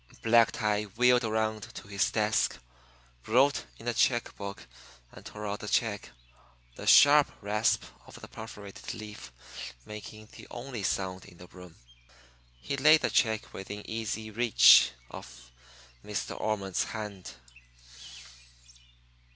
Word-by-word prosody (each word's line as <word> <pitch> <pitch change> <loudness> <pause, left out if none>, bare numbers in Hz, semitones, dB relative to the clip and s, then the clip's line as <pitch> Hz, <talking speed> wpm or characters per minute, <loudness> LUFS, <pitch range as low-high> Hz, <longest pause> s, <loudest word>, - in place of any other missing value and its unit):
Black 115 0 +4
Tie 105 -2 -1
wheeled 125 0 +4
around 110 -1 -2
to - - -9
his 100 0 0
desk, 110 0 0 0.7
wrote 135 +5 +2
in 115 - -11
a 120 - 0
check 120 +1 +1
book 100 -1 -8 0.5
and - - -14
tore 105 0 -8
out 105 0 -3
the 105 - -8
check, 105 -2 -1 0.7
the - - -9
sharp 145 0 +7
rasp 105 +2 0 0.2
of - - -13
the - - -11
perforated 105 -3 -9
leaf 105 - -10 0.5
making 110 0 -10
the - - -13
only 120 -2 -7
sound 95 -1 -2
in 90 -4 -16
the 90 - -12
room. 90 -2 -14 0.8
He 100 - -4
laid 155 +3 +6
the - - 0
check 110 -2 0
within 100 +2 -8
easy 110 -1 -4
reach 115 - +6 0.2
of - - -12 0.5
Miss - - -4
De - - -7
Ormond's 100 -4 -2
hand. 105 -4 -7
110 Hz, 135 wpm, -29 LUFS, 100-115 Hz, 0.8 s, sharp